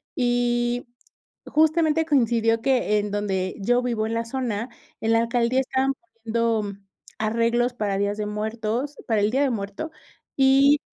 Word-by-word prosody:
y, 245 0 0 0.6
justamente 315 0 +2
coincidió 230 -5 +2
que 245 -5 +2
en 205 0 -3
donde 195 -2 -1
yo 245 +5 +2
vivo 230 -3 -1
en 225 - -3
la 230 0 -1
zona, 235 -2 -3 0.3
en 225 0 +1
la 230 - +4
alcaldía 235 +2 +1
estaban 265 +1 0 0.3
poniendo 225 -3 0 0.4
arreglos 230 +3 +1
para 205 -4 -1
días 200 +1 -1
de 210 - -2
muertos, 220 +6 -3
para 220 -4 +2
el 210 +2 +2
día 270 - +1
de 280 - +3
muerto, 205 +7 -4 0.5
y 275 +2 +5
235 Hz, 150 wpm, -24 LUFS, 215-260 Hz, 0.6 s, y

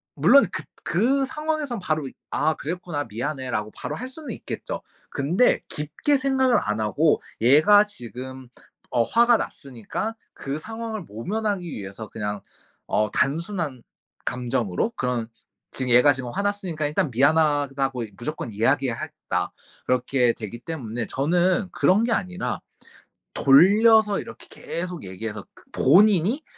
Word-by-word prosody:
물론 280 - +6
그 - - -4 0.2
그 260 +9 +2
상황에선 300 -4 -3
바로 155 -5 -1
"이 - - -10 0.2
아. 155 +2 +2
그랬구나 165 -2 -4
미안해."라고 120 -2 -3
바로 - - -5
할 255 - -6
수는 300 +3 -10
있겠죠. - - -6 0.3
근데 170 - +2
깊게 150 - 0
생각을 265 -2 +3
안 105 0 -2
하고 145 +9 +2 0.2
얘가 155 - +6
지금 130 - -9 0.4
어 120 - +2
화가 235 - +4
났으니까 135 - -5 0.2
그 140 +2 -5
상황을 225 +2 -5
모면하기 190 - -3
위해서 100 0 -7
그냥 105 -2 -4 0.5
어 105 0 +1
단순한 155 - -1 0.4
감정으로 125 - -1
그런 125 -3 -1 0.4
'지금 130 -1 -3
얘가 125 +4 +7
지금 125 -2 -5
화 200 - -2
났으니까 190 -7 -2
일단 150 0 0
미안하다고 140 -1 +2
무조건 120 0 -5
이야기 130 +6 +2
하겠다.' 115 -2 -3 0.3
그렇게 125 -1 +2
되기 115 +1 -7
때문에 120 -6 -5
저는 175 +6 +1
그런 200 +5 +3
게 235 - 0
아니라 180 -4 -2 0.7
돌려서 210 +8 +5
이렇게 - - -9
계속 175 -1 -6
얘기해서 105 +3 -6
그 - - -19
본인이 210 - +4
150 Hz, 300 characters per minute, -24 LUFS, 125-205 Hz, 0.7 s, 얘가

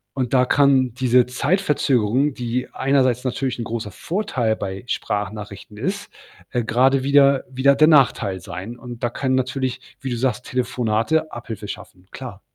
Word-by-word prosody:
und 130 -1 -2
da 125 0 +5
kann 135 -3 +3
diese 125 0 +3
Zeitverzögerung, 135 - +1
die 125 +1 -2
einerseits 130 -2 +1
natürlich 130 0 -2
'n 115 - -2
großer 110 -2 -4
Vorteil 130 - -1
bei 95 +1 -5
Sprachnachrichten 105 -1 -4
ist, 200 - -3 0.4
äh, 120 -2 0
grade 130 +4 +2
wieder 140 -1 +4
wieder 135 +2 +3
der 155 +2 +5
Nachteil 130 - +3
sein. 95 +6 -8
Und 120 -1 -10
da 120 - +2
kann 130 +2 -1
natürlich, 130 -1 -2 0.2
wie 135 - -4
du 120 - -2
sagst, 125 0 -1
Telefonate 125 +5 0
Abhilfe 115 -3 -7
schaffen, 90 -2 -10
klar. 125 -7 -8
125 Hz, 155 wpm, -21 LUFS, 115-135 Hz, 0.4 s, da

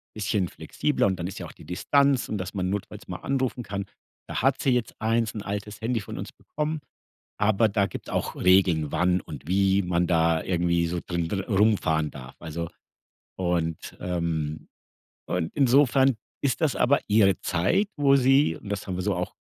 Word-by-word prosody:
bisschen 105 -3 0
flexibler - - -1
und 95 - 0
dann 85 - -4
ist 95 +2 -7
ja - - -6
auch - - -11
die - - -15
Distanz 140 +8 +2
und 105 - -2
dass 95 -1 -5
man 90 -2 -1
notfalls 100 0 -5
mal - - -5
anrufen 130 -2 -1
kann, 100 -2 -4 0.4
da - - -2
hat 135 0 +2
sie - - +2
jetzt 125 -2 0
eins, 115 0 +1
'n 105 - -4
altes 105 +1 -5
Handy 115 0 0
von 100 - -7
uns - - -6
bekommen, 150 +1 -4 0.6
aber 110 +2 +3
da 100 -1 +2
gibt 90 - -8
auch - - -2
Regeln, 90 -5 +3
wann 90 +1 +2
und 75 -4 -9
wie 95 +1 +3
man 90 -1 0
da 80 -1 +3
irgendwie 85 -1 +1
so 85 +1 -2
drin 85 -2 -2
dri 95 +1 -1
rumfahren 95 -7 +2
darf. 65 -3 -10
Also, 85 0 -5 0.7
und 85 -3 -2
ähm 85 -4 -2 0.6
und 85 -2 -2
insofern 135 -1 +4 0.3
ist 140 +4 0
das 155 -4 +2
aber 140 +3 +3
ihre 100 -3 +4
Zeit, 170 - +1
wo 140 -2 +5
sie, 135 +2 +4
und 100 - -10
das 100 -1 -3
haben 95 -2 -3
wir 95 - -2
so 100 +1 0
auch 90 0 -3
100 Hz, 190 wpm, -26 LUFS, 85-120 Hz, 0.7 s, wo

